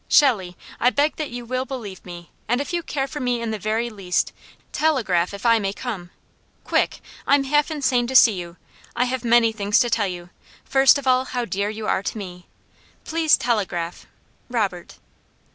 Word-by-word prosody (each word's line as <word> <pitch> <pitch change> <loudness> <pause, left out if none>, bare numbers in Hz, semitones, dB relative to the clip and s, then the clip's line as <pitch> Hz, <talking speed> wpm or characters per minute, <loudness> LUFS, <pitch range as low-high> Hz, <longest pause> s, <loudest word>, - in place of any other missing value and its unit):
"'Shelley, 200 - +3 0.2
I 245 - +4
beg 290 +4 +1
that 305 -2 -3
you 240 0 -7
will 255 +2 -2
believe 235 -8 -7
me, 175 -1 -10 0.2
and 245 +3 +1
if 285 +5 -4
you 345 - 0
care 280 -4 -2
for 295 +2 -7
me 245 -3 0
in 230 -1 -3
the 215 - -4
very 220 +4 -1
least, 190 -4 -1 0.4
telegraph 220 - +1
if 200 +3 -9
I 230 -1 +5
may 195 -1 -2
come. 205 -8 -6 0.5
Quick! - - 0 0.3
I'm 280 0 +4
half 295 +3 +2
insane 260 -6 +1
to 260 - -4
see 240 - +8
you. 175 -2 -7 0.4
I 250 - +2
have 255 0 -3
many 235 -1 +4
things 205 -1 +1
to 240 - 0
tell 210 -3 +2
you, 175 -1 -7 0.3
first 270 +1 +5
of 280 - -7
all 255 0 +3
how 245 -2 -3
dear 200 0 -2
you 215 0 -6
are 190 - +1
to 210 - -4
me. 180 -3 -8 0.6
Please 320 -1 +3
telegraph. 185 -8 -2 0.4
Robert.'" 200 -8 -2
235 Hz, 190 wpm, -22 LUFS, 195-260 Hz, 0.6 s, see